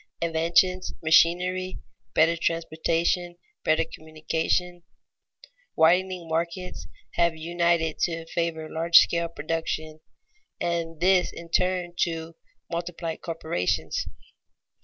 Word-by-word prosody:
_ - - -28 0.2
Inventions, 170 +3 +2
machinery, 180 +3 +3 0.4
better 165 +2 +4
transportation, 165 +1 0 0.3
better 155 +1 +3
communication, 160 +3 -2 0.9
widening 180 +1 +3
markets, 170 +3 -3 0.3
have 170 -1 +2
united 170 -1 0
to 165 -1 -1
favor 165 -1 -2
large 165 +2 +4
scale 170 0 +4
production, 155 0 -4 0.6
and 165 -2 -2
this 180 0 +3
in 170 0 -10
turn 180 -1 +1
to 165 -1 -1 0.4
multiply 170 -1 -3
corporations. 90 - -2
170 Hz, 95 wpm, -26 LUFS, 160-175 Hz, 0.9 s, better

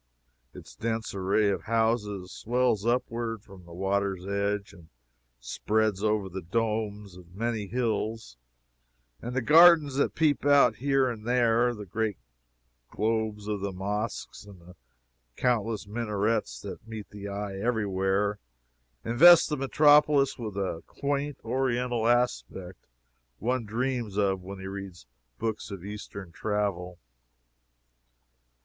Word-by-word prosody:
Its - - -12
dense 115 - -3
array 100 +2 +1
of - - -4
houses 110 -4 0
swells 120 -3 0
upward 115 -3 -1
from 95 -3 -15
the 85 - -15
water's 95 +1 -1
edge, 100 0 -2
and 85 -2 -16 0.5
spreads 105 - -1
over 105 -2 +1
the 95 +1 -6
domes 105 0 -2
of 90 0 -15
many 110 -1 -2
hills; 110 - -2 0.9
and 120 +2 -5
the 130 - 0
gardens 155 -2 +7
that 140 - +1
peep 155 -3 +2
out 140 -6 +5
here 135 0 +2
and 115 -2 -5
there, 120 -1 +3
the 105 -1 -8
great 110 +1 -2 0.7
globes 110 -1 -1
of 105 -1 -2
the 100 0 -2
mosques, 105 +5 -4
and 100 -3 -14
the 90 +1 -16 0.6
countless 115 -4 0
minarets 105 0 -1
that - - -9
meet 110 -2 -7
the 100 -1 -8
eye 100 0 -4
every 110 0 0
where, 95 +2 0 0.7
invest 165 +9 +7
the 150 - 0
metropolis 145 +1 +4
with 110 -5 -6
the 95 -4 -3
quaint 140 0 -2
Oriental 125 -1 0
aspect 120 -7 -1 0.5
one 125 +1 -1
dreams 120 -1 -2
of 95 -2 +1
when 95 +2 -8
he 95 - -9
reads 95 -6 -8 0.3
books 110 0 -3
of 100 -3 -8
eastern 100 -3 -8
travel. 95 -3 -2
110 Hz, 130 wpm, -28 LUFS, 100-120 Hz, 0.9 s, gardens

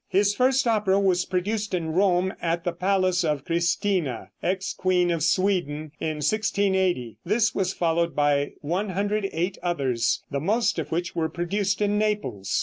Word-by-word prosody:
His 200 +2 +3
first 260 +3 +2
opera 210 -4 +2
was 185 -2 +2
produced 205 +2 -1
in 165 -3 -2
Rome 185 0 +2
at 170 0 -1
the 175 - 0
palace 185 0 +1
of 150 -4 -1
Christina, 170 -2 0
ex 185 +1 -1
queen 180 -1 +1
of 165 -2 -1
Sweden, 160 -4 0
in 155 -1 -2
1680. 190 - 0
This 215 +4 +2
was 190 -1 0
followed 170 -2 0
by 145 -1 +1
108 195 +1 -1
others, 135 -9 0
the 140 - -1
most 220 +8 +1
of - - -5
which 175 +2 -2
were 160 -1 0
produced 195 +4 -1
in 205 0 +1
Naples. 210 - -1
180 Hz, 150 wpm, -25 LUFS, 165-200 Hz, -, His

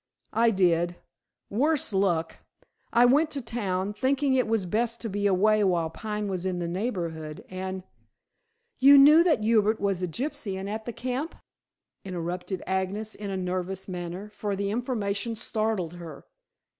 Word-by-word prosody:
"I 230 +2 +4
did, 175 -4 +2 0.6
worse 275 +2 +1
luck. 175 -4 +1 0.5
I 240 +1 +5
went 290 +6 +4
to 285 - -2
town, 205 -5 -2
thinking 265 +5 +1
it 255 -2 +2 0.2
best 230 +1 0
to 225 - -3
be 205 +1 0
away 210 +2 +3
while 170 -4 +1
Pine 210 +1 -4
was 185 -2 -3
in 185 -1 -1
the 175 -1 -2
neighborhood, 170 -6 -4
and 185 0 -4 0.5
" 465 0 -49
"You 280 +2 +9
knew 300 +4 +8
that 310 -11 +2
Hubert 215 -1 +3
was 195 -3 0
a 180 - 0
gypsy 250 - -4
and 190 +1 -5
at 220 +2 -4
the 240 - -3
camp?" 255 +7 -4 0.7
interrupted 180 0 -4
Agnes 190 +3 -2
in 205 -1 -6
a 195 - -2
nervous 185 +1 -3
manner, 180 +2 -5
for 205 -1 -3
the 200 0 -2
information 225 -2 -2
startled 215 -6 -1
her. 170 -4 -10
205 Hz, 155 wpm, -27 LUFS, 185-235 Hz, 0.7 s, You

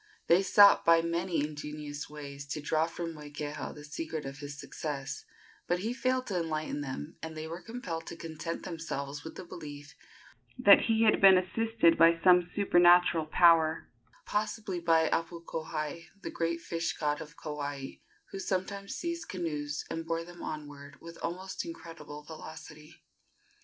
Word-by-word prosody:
They 175 +3 +5
sought 200 +1 +7
by 165 0 +5
many 170 0 0
ingenious 150 -1 -6
ways 140 -1 -8
to 150 - -3
draw 155 +2 +1
from 165 0 -5
Moikeha 150 0 -6
the 150 - -10
secret 155 +1 -5
of 135 0 -7
his 145 -1 -7
success; 145 -4 -5 0.4
but 175 - +2
he 225 +4 -1
failed 255 0 0
to 185 -4 -1
enlighten 155 -3 -2
them, 130 - -6
and 160 -1 -6
they 155 0 -5
were 165 +2 -6
compelled 175 -7 -6
to - - -6
content 165 0 -5
themselves 145 -4 -5
with 160 - -8
the - - -8
belief 145 -5 -9 0.6
that 200 - +8
he 225 0 +3
had 215 - +4
been 190 -1 +9
assisted 185 -1 +2
by 165 0 +6
some 180 -1 +6
supernatural 175 -4 +5
power, 165 -1 +4 0.4
possibly 210 -3 -2
by 165 -1 +3
Apukohai, 165 -1 -3 0.2
the - - -4
great 165 0 -1
fish 165 0 -2
god 150 -1 -1
of 150 +1 -10
Kauai, 145 -2 -5 0.3
who 195 - -5
sometimes 195 +1 -3
seized 340 0 -4
canoes 150 -5 -3
and 165 0 -4
bore 165 0 -1
them 175 0 -12
onward 145 -2 -7
with 170 0 -11
almost 185 +3 -4
incredible 165 - -9
velocity. 155 0 -11
165 Hz, 155 wpm, -31 LUFS, 150-175 Hz, 0.6 s, been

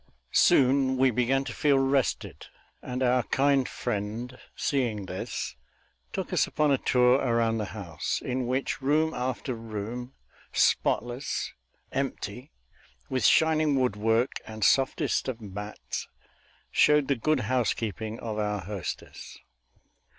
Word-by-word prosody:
Soon 130 0 +4
we 130 0 +4
began 125 +3 +1
to - - -6
feel 145 -2 +3
rested, 135 -1 0 0.3
and 125 +1 -3
our 125 0 +3
kind 135 +2 +2
friend, 110 +5 -4 0.2
seeing 120 -8 -1
this, 95 0 -4 0.6
took - - -4
us - - +3
upon 150 -1 +1
a 135 - +3
tour 125 0 +4
around 115 -3 +1
the 105 - -1
house, 85 -6 -3
in 125 -1 -2
which 130 +2 -1
room 155 +4 +2
after 130 +1 -2
room, 115 +3 -6 0.4
spotless, 120 +3 0 0.4
empty, - - -4 0.6
with 130 -3 -1
shining 155 +2 +4
woodwork 115 +1 +1 0.2
and 110 -1 -5
softest 135 +3 +2
of 125 -3 -3
mats, 105 0 -6 0.6
showed 150 -2 +4
the 140 - +2
good 145 +3 +1
housekeeping 110 -2 -1
of 110 -2 -4
our 105 -1 -1
hostess. 100 +1 -6
125 Hz, 120 wpm, -28 LUFS, 110-135 Hz, 0.6 s, Soon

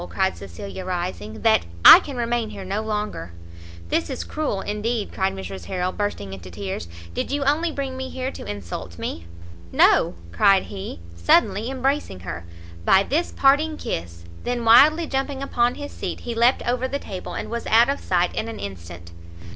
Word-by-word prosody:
cried 190 -1 0
Cecilia, 100 - -8
rising, 175 - -4
"[that] 85 -6 +4 0.2
I - - +13
can 280 -3 -7
remain 235 -1 -1
here 200 -3 -8
no 200 +3 -2
longer." 210 - -4 0.6
"This 165 - 0
is 265 - -4
cruel 295 -11 -2
indeed," 210 +2 -2
cried 190 0 0
Mrs. 190 0 -7
Harrel, 185 -1 -2
bursting 185 - -3
into 90 -1 -9
tears; 95 -1 -5 0.3
"did - - -3
you 285 0 -1
only 310 +5 +1
bring 275 -3 -4
me 260 0 -4
here 260 +1 -4
to - - -9
insult 90 -4 -6
me?" 85 +1 -5 0.4
"No!" - - +4 0.2
cried 190 - +4
he, 195 - -7
suddenly 195 - +3
embracing 265 - -1
her, 85 -1 -6 0.4
"by 190 - +5
this 315 +10 -1
parting 300 +3 +3
kiss!" 85 0 -5 0.2
then 245 -1 -2
wildly 300 +9 +7
jumping 270 -1 -2
upon 245 -2 +1
his 290 0 -7
seat, - - -5
he 240 - -4
leapt 235 +3 +2
over 250 +1 0
the 280 - -2
table, 190 -9 -7
and - - -5
was 235 0 -4
out 230 +2 +6
of 280 +1 -1
sight 180 -1 +1
in 220 - -2
an 225 - -6
instant. 85 -3 -8
210 Hz, 180 wpm, -23 LUFS, -, 0.6 s, I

